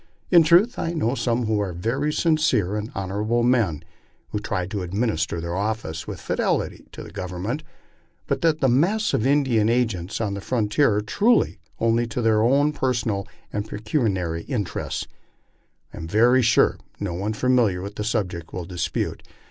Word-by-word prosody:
In 175 -2 +8
truth 175 +10 +4
I 165 - -1
know 125 -7 0
some 120 -2 0
who 110 -1 +1
are 100 -3 -2
very 120 - -1
sincere 150 - +2
and 105 +1 -4
honorable 105 +5 -1
men, 115 - +2 0.5
who 105 - -2
try 105 -3 -2
to 100 +1 -4
administer 90 -3 -1
their 85 +1 -4
offices 100 -6 -3
with - - -6
fidelity - - -1
to - - -8
the - - -11
Government; 95 - -4 0.6
but - - -1
that 160 -2 +2
the 135 - +4
mass 180 - +2
of 115 - +1
Indian 130 -6 +3
agents 115 -7 0
on 105 -3 -1
the 100 - -5
frontier 115 +1 +2
are 105 - +1
true 210 - +3 0.3
only 115 +1 +2
to 115 +2 -4
their 110 -2 +3 0.3
personal 115 -8 -1 0.3
and 105 +1 -3
pecuniary 100 - -1
interests, 105 -9 -3 0.9
I - - -10
am 80 - -6
very 120 +7 +4
sure 120 -1 +3 0.2
no 100 -4 -3
one 100 +5 -2
familiar 115 -6 +2
with 100 +1 -6
the 105 - -4
subject 90 -7 -2
will 90 -2 -5
dispute. 90 0 -3
110 Hz, 165 wpm, -23 LUFS, 95-125 Hz, 0.9 s, In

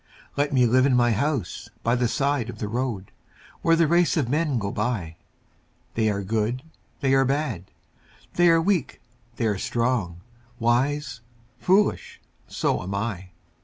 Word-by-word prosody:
Let 145 +1 0
me 130 -3 +4
live 130 +3 +4
in 130 - +3
my 120 -1 +3
house 135 - -2
by 115 - +2
the 125 -1 +2
side 140 -1 0
of - - -7
the 105 - -4
road, 115 -4 -3 0.5
Where 165 - +4
the 165 0 +4
race 170 +2 +3
of 135 -6 0
men 150 -1 +1
go 100 -2 -2
by 105 -8 -3 0.8
They 110 -1 +1
are 100 -1 -2
good, 110 +5 -1 0.4
they 135 -1 +2
are 135 0 +5
bad, 135 - -1 0.7
they 175 0 +4
are 165 0 +5
weak, 175 -3 0 0.4
they 115 - -2
are 105 -3 0
strong, 115 -9 -1 0.4
Wise, 125 +2 0 0.4
foolish 195 +3 +1 0.3
so - - -1
am 95 +2 -4
I. 100 -3 -3
125 Hz, 160 wpm, -24 LUFS, 110-145 Hz, 0.8 s, are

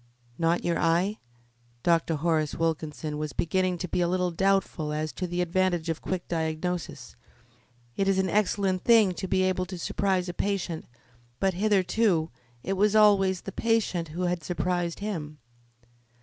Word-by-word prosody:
"Not 170 +1 +1
your 170 - +1
eye?" 175 +6 +1 0.6
Dr. 165 -1 +2
Horace 155 -1 0
Wilkinson 155 -2 -2
was 150 -1 -4
beginning 185 +1 0
to 180 - -4
be 180 - -1
a 175 - +2
little 180 0 0
doubtful 190 -4 0
as 155 0 -2
to 180 - -3
the 175 +1 -2
advantages 175 -1 0
of 165 - -2
quick 185 -2 -3
diagnosis. 160 -4 -3 0.8
It 195 - 0
is 195 -1 +3
an 190 0 +2
excellent 195 -1 +1
thing 220 -5 +5
to 190 +2 -5
be 185 0 +2
able 185 -1 0
to 185 0 -6
surprise 185 +1 0
a 175 - -4
patient, 185 -3 -2 0.5
but 195 -1 +2
hitherto 190 -3 +2 0.3
it 195 - -1
was 205 +2 +2
always 195 -3 +4
the 195 - -7
patient 215 -6 0
who 170 +4 -4
had 175 -2 -1
surprised 175 0 -2
him. 160 -8 -4
180 Hz, 160 wpm, -27 LUFS, 165-195 Hz, 0.8 s, thing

